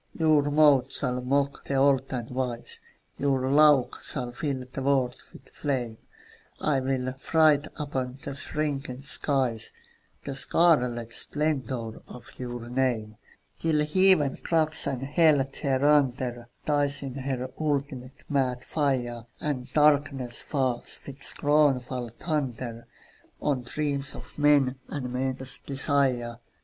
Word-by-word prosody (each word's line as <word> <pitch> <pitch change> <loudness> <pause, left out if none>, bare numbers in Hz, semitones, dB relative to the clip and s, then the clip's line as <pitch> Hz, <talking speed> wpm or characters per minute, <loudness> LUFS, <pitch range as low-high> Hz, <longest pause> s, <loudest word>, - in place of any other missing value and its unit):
Your 155 -3 +3
mouth 145 -3 +5
shall 125 -1 +1
mock 140 +2 0
the 140 - -2
old 135 -1 +3
and 120 -3 -3
wise, 125 -2 -4 0.4
Your 135 -1 +1
laugh 145 -4 +5
shall 125 -4 -4
fill 130 0 -3
the 135 - -4
world 130 -2 +1 0.2
with 130 - -15
flame, 125 -6 -3 0.6
I'll 140 -3 +1 0.5
write 155 -2 +5
upon 130 -3 -3
the 140 - -4
shrinking 140 -2 -3
skies 130 -5 -1 0.5
The 140 - -4
scarlet 125 -6 +2
splendour 130 -7 -2
of 125 - -12
your 120 -2 -5
name, 120 -4 -1 0.4
Till 155 -2 +2
Heaven 180 -4 +3
cracks, 160 -2 +1
and 130 -1 -2
Hell 145 -1 +4
thereunder 130 -4 +1 0.2
Dies 145 -1 +1
in 135 -2 -5
her 130 -1 -3
ultimate 140 -4 -3
mad 130 -3 0
fire, 125 -6 -1
And 130 -4 -3
darkness 145 -5 +2
falls, 130 -4 -2
with 140 0 -10
scornful 135 -5 +1
thunder, 125 -7 -3 0.5
On 140 -4 0
dreams 140 +2 -3
of - - -11
men 145 -3 +4
and 125 -4 -4
men's 130 0 -3
desire. 135 -4 0
135 Hz, 120 wpm, -27 LUFS, 125-145 Hz, 0.6 s, mouth